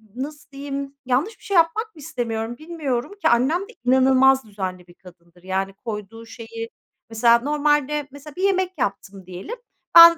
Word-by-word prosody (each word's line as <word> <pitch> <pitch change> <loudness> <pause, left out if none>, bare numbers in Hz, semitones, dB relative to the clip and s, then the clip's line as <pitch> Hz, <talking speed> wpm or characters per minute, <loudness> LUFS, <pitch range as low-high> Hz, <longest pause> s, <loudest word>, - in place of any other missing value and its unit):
nasıl 290 +2 -6
diyeyim, 275 0 -5
yanlış 280 - 0
bir - - -22
şey 400 - -2
yapmak 350 +6 +2
mı - - -14
istemiyorum, 235 -6 -3
bilmiyorum 300 -4 -3
ki? - - +4
Annem 260 +9 +3
de 445 +4 -9
inanılmaz 265 0 +5
düzenli 185 -3 -5
bir 175 - -16
kadındır. 175 -1 -18
Yani, 190 +1 -2
koyduğu 225 +1 -7
şeyi, 230 0 -7 0.4
mesela 235 +1 +5
normalde, 295 +1 +1
mesela 285 +1 -11
bir 370 - -3
yemek 375 -3 +1
yaptım 195 -4 -3
diyelim; 185 - -7 0.4
ben 335 0 +11
260 Hz, 160 wpm, -23 LUFS, 220-300 Hz, 0.4 s, ben